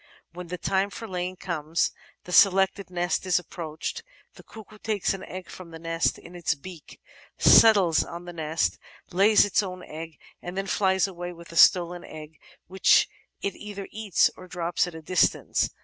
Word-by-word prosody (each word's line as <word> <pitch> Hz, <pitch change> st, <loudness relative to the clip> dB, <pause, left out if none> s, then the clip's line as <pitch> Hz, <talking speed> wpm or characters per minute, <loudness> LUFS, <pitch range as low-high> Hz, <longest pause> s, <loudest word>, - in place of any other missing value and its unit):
When 180 Hz, 0 st, -8 dB
the 180 Hz, +1 st, -5 dB
time 195 Hz, +2 st, 0 dB
for 225 Hz, +3 st, -8 dB
laying 180 Hz, -1 st, -4 dB
comes, 165 Hz, -3 st, -1 dB, 0.3 s
the 180 Hz, -, -10 dB
selected 195 Hz, 0 st, +4 dB
nest 175 Hz, -1 st, -1 dB
is 180 Hz, -, +3 dB
approached, 165 Hz, -3 st, -5 dB, 0.3 s
the -, -, -14 dB
cuckoo 215 Hz, -1 st, -14 dB
takes 210 Hz, -3 st, -1 dB
an 195 Hz, -, -7 dB
egg 185 Hz, -1 st, -8 dB
from 185 Hz, -2 st, -11 dB
the 165 Hz, -, -9 dB
nest 165 Hz, 0 st, -1 dB
in 175 Hz, -, -14 dB
its 175 Hz, -2 st, -1 dB
beak, 170 Hz, +2 st, -12 dB, 0.4 s
settles 200 Hz, -7 st, +6 dB
on 170 Hz, +1 st, -9 dB
the 175 Hz, -, -8 dB
nest, 160 Hz, 0 st, -1 dB, 0.3 s
lays 205 Hz, +4 st, +5 dB
its 205 Hz, -, +2 dB
own 185 Hz, -2 st, -7 dB
egg> 160 Hz, 0 st, -9 dB, 0.2 s
and 175 Hz, +2 st, -7 dB
then 195 Hz, -, -1 dB
flies 190 Hz, -1 st, +2 dB
away 175 Hz, -2 st, -6 dB
with 170 Hz, 0 st, -14 dB
the 165 Hz, -, -11 dB
stolen 175 Hz, +1 st, +5 dB
eggy 155 Hz, 0 st, -11 dB, 0.3 s
which 190 Hz, +3 st, +4 dB, 0.4 s
it 200 Hz, -, -2 dB
either 205 Hz, -2 st, -8 dB
eats 215 Hz, -5 st, +2 dB
or 185 Hz, -, -12 dB
drops 175 Hz, -1 st, -1 dB
at 175 Hz, -, -9 dB
a 160 Hz, -, -9 dB
distance. 180 Hz, +3 st, +1 dB
180 Hz, 180 wpm, -26 LUFS, 170-195 Hz, 0.4 s, settles